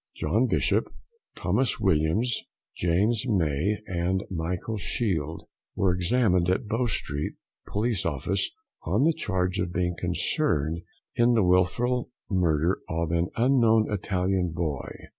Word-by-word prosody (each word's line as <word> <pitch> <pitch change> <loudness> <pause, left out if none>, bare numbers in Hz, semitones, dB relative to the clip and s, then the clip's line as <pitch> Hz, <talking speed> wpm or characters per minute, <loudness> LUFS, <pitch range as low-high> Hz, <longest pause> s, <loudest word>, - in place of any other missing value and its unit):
John - - +1
Bishop, - - +1 0.4
Thomas 130 -5 +1
Williams, 95 +7 +1 0.3
James 100 +8 +1
May, 90 - +1
and 90 +1 -1
Michael 90 +5 -3
Shield, 85 - -2 0.3
were 95 -2 +2
examined 90 -1 +2
at 95 +6 +1
Bow 115 +3 0
Street 75 -8 -2 0.3
Police 110 -1 0
Office 85 +5 -1 0.3
on - - +1
the 165 +2 +4
charge 95 - -1
of 90 -1 -1
being 90 0 0
concerned 80 +1 0 0.3
in 120 0 +4
the 110 - +4
wilful 95 +8 +2 0.2
murder 85 -2 +2
of 80 0 -1
an 85 +1 +1
unknown 115 -3 +3
Italian 95 -2 0
boy. 75 -6 -2
90 Hz, 120 wpm, -26 LUFS, 85-110 Hz, 0.4 s, the